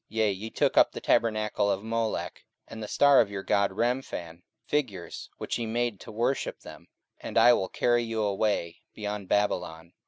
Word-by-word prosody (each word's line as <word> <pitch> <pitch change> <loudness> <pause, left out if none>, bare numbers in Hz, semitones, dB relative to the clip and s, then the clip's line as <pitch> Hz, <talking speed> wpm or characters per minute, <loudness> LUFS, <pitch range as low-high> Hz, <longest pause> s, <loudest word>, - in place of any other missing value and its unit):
44:007:043 110 - -10
Yea, 110 -2 +3
ye 100 +4 -6
took - - 0
up - - +6
the - - -6
tabernacle 110 -2 +1
of 100 0 -1
Moloch, 115 0 -2 0.3
and 110 - -9
the 105 - -5
star 140 +3 +5
of 105 - -1
your 100 -1 -5
god 100 0 +2
Remphan, 100 -6 -3 0.2
figures 110 -12 -3
which - - -3
ye 115 - -2
made 120 -2 -1
to - - -10
worship 120 +5 -1
them: - - -12 0.3
and - - -5
I 120 - +7
will 95 - 0
carry 120 0 +2
you 115 -2 -2
away 100 -4 -1 0.2
beyond 105 -2 -5
Babylon. 85 -5 -1
110 Hz, 185 wpm, -28 LUFS, 100-115 Hz, 0.3 s, I